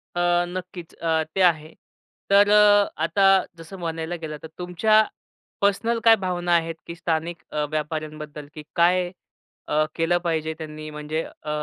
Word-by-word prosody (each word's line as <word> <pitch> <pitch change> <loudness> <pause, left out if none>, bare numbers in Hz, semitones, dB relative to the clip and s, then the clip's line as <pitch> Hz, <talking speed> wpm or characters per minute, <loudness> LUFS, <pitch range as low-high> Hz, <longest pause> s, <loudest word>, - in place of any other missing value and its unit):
अ, 175 - -1 0.3
नक्कीच. 180 -1 -7
अ, 160 -1 0
ते 190 - +1
आहे 155 -1 -6 0.6
तर 200 +1 +6 0.5
आता 200 - +1 0.3
जसं 165 +4 -10
म्हणायला 165 0 -3
गेलं 155 -1 -5
तर - - -6
तुमच्या 215 +5 +3 0.6
पर्सनल 225 +4 +1
काय 225 -1 +8
भावना 180 -3 -1
आहेत, 165 0 0
की 170 - -6
स्थानिक 165 0 -2
अ, 150 -1 -1
व्यापाऱ्यांबद्दल 155 -1 -5
की 155 - -9
काय 175 +1 +3 0.6
अ, 155 +1 +2
केलं 165 +2 +2
पाहिजे 160 -1 -1
त्यांनी 155 -1 -8
म्हणजे 150 +1 -4
अ, 150 - -11
165 Hz, 145 wpm, -24 LUFS, 155-180 Hz, 0.6 s, काय